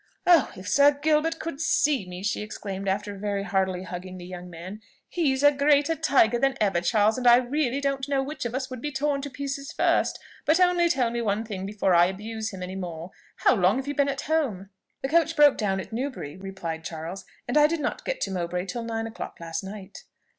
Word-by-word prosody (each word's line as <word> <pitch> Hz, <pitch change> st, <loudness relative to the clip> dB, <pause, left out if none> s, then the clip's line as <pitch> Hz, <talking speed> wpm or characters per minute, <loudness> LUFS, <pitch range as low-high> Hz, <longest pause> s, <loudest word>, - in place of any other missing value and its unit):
"Oh! 340 Hz, -6 st, +5 dB
if 185 Hz, +1 st, -9 dB
Sir 285 Hz, +6 st, +5 dB
Gilbert 315 Hz, +2 st, +2 dB
could 320 Hz, -3 st, -5 dB
see 285 Hz, -, +2 dB
me!" 180 Hz, +1 st, -7 dB
she 210 Hz, -, -1 dB
exclaimed 200 Hz, -2 st, -6 dB
after 200 Hz, +1 st, -1 dB
very 200 Hz, 0 st, -2 dB
heartily 190 Hz, -2 st, 0 dB
hugging 185 Hz, +1 st, -7 dB
the 175 Hz, -, -9 dB
young 180 Hz, 0 st, -8 dB
man. 180 Hz, +5 st, -9 dB, 0.3 s
"He's 285 Hz, -6 st, 0 dB
a 290 Hz, -, +8 dB
greater 290 Hz, +2 st, +3 dB
tiger 265 Hz, -7 st, +3 dB
than 270 Hz, 0 st, +1 dB
ever, 195 Hz, -5 st, +2 dB
Charles, 215 Hz, +5 st, +2 dB
and 250 Hz, -, 0 dB
I 240 Hz, -, +9 dB
really 260 Hz, +1 st, 0 dB
don't 275 Hz, -1 st, -2 dB
know 275 Hz, -1 st, +1 dB
which 300 Hz, +3 st, -5 dB
of 240 Hz, 0 st, -3 dB
us 260 Hz, 0 st, -2 dB
would 255 Hz, -2 st, -6 dB
be 295 Hz, -, -3 dB
torn 280 Hz, +1 st, 0 dB
to 285 Hz, -, -5 dB
pieces 280 Hz, 0 st, -5 dB
first; -, -, +1 dB, 0.3 s
but 315 Hz, +4 st, +3 dB
only 355 Hz, -1 st, +4 dB
tell 250 Hz, -6 st, +1 dB
me 235 Hz, 0 st, -2 dB
one 215 Hz, 0 st, -1 dB
thing 195 Hz, -3 st, -5 dB
before 200 Hz, -2 st, +1 dB
I 175 Hz, 0 st, +6 dB
abuse 220 Hz, +3 st, -4 dB
him 190 Hz, -2 st, -7 dB
any 185 Hz, +1 st, -6 dB
more: 175 Hz, -2 st, -6 dB, 0.2 s
how -, -, +3 dB
long 195 Hz, 0 st, +3 dB
have 265 Hz, +1 st, -4 dB
you 285 Hz, -, -1 dB
been 280 Hz, 0 st, +2 dB
at 275 Hz, -1 st, -3 dB
home?" 245 Hz, -12 st, -1 dB, 0.3 s
"The 270 Hz, -, -1 dB
coach 330 Hz, +1 st, +3 dB
broke 295 Hz, -2 st, +6 dB
down 195 Hz, -3 st, -1 dB
at 190 Hz, -, -8 dB
Newberry," 245 Hz, -, -4 dB
replied 185 Hz, -4 st, -6 dB
Charles, 165 Hz, +4 st, -6 dB, 0.2 s
"and 245 Hz, -, -2 dB
I 300 Hz, 0 st, +7 dB
did 330 Hz, +1 st, -2 dB
not -, -, -3 dB
get -, -, -3 dB
to -, -, -1 dB
Mowbray 180 Hz, 0 st, -2 dB
till 235 Hz, +5 st, -4 dB
nine 225 Hz, -1 st, -3 dB
o'clock 225 Hz, 0 st, -7 dB
last 165 Hz, +2 st, -4 dB
night." 195 Hz, 0 st, -9 dB
225 Hz, 225 wpm, -26 LUFS, 190-280 Hz, 0.3 s, I